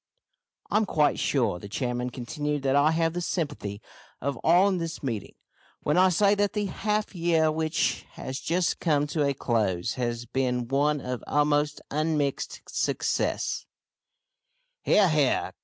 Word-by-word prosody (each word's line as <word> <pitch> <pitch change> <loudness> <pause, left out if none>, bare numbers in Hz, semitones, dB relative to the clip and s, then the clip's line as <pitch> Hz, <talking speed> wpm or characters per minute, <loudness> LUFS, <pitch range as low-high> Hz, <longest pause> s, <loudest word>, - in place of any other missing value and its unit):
"I - - +3
am 215 -1 +2
quite 150 -4 +2
sure," 115 -10 +1
the 100 - -9
chairman 125 +2 -2
continued, 145 +4 -3
"that 135 0 +2
I 145 +2 +5
have 165 0 +1
the 175 - -2
sympathy 145 - -3 0.4
of 140 +1 -2
all 175 +4 +5
in 190 -3 0
this 165 -2 -5
meeting 115 -7 -4 0.5
when 150 - +1
I 185 +1 +6
say 200 +3 +4
that 205 -1 +1
the 210 -1 -1
half 210 +2 -1
year 165 -3 +2
which 160 0 -1
has 130 +1 -5
just 175 +1 0
come 150 -4 +2
to 150 +1 -1
a 140 -1 +1
close 105 -9 0
has 120 -1 -2
been 125 -1 -1
one 145 +2 +1
of 125 -1 -4
almost 145 0 +1
unmixed 150 -2 -1
success - - -1 0.5
" - - -50
"He - - +3
ar, 205 -2 +6
he 150 -4 +3
ar!" - - -1
150 Hz, 165 wpm, -27 LUFS, 130-175 Hz, 0.5 s, I